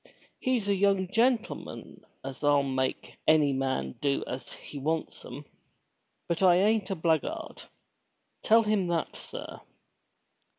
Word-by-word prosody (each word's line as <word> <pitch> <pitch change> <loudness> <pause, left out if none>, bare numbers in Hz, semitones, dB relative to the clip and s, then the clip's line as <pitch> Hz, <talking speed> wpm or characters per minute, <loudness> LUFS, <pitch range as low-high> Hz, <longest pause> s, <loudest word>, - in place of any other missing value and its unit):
He's 250 -5 0
a 200 - +3
young 195 -1 +2
gentleman 235 +2 -1 0.2
as 135 0 -7
'11 140 -2 +3
make 130 0 -2
any 150 -3 +5
man 130 - -2
do 140 -1 +1
as 130 +1 -6
he 145 - -9
wants 160 +3 -2
'em. - - -9 0.8
But 170 +1 -1
I 180 -2 +6
ain't 210 +2 +2
a 195 - -1
blackguard. 160 -2 -1 0.8
Tell 225 +1 +5
him 210 -4 +1
that, 170 -2 -1
sir." - - -8
170 Hz, 130 wpm, -29 LUFS, 140-200 Hz, 0.8 s, I